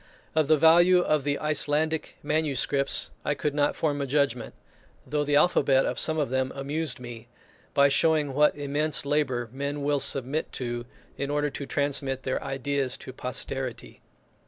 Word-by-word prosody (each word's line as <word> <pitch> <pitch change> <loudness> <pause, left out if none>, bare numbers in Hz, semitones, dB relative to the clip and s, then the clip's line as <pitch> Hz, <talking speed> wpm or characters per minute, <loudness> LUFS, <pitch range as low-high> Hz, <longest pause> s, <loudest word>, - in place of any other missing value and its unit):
Of 155 -2 +2
the 155 0 +5
value 175 +4 +6
of 155 -4 +1
the 145 0 0
Icelandic 155 +1 -1
manuscripts 145 -2 0
I 145 - 0
could 150 -1 -2
not 145 0 +1
form 145 -3 -1
a 140 - -2
judgment, 135 -3 0 0.5
though 150 0 -1
the 145 0 0
alphabet 140 -4 +4
of - - -2
some 155 - +2
of 145 -5 -1
them 130 0 0
amused 140 0 -3
me, 120 -2 -9 0.5
by 140 0 +6
showing 150 0 +2
what 150 +1 +3
immense 145 +1 0
labour 140 -5 0
men 140 +2 -4
will 145 0 +1
submit 135 +3 0
to, 120 -1 -4 0.3
in 140 +1 -2
order 145 0 0
to 135 0 -6
transmit 140 -2 -1
their 130 - -2
ideas 135 -1 -2
to 130 - -10
posterity. 130 0 -4
145 Hz, 160 wpm, -26 LUFS, 135-150 Hz, 0.5 s, value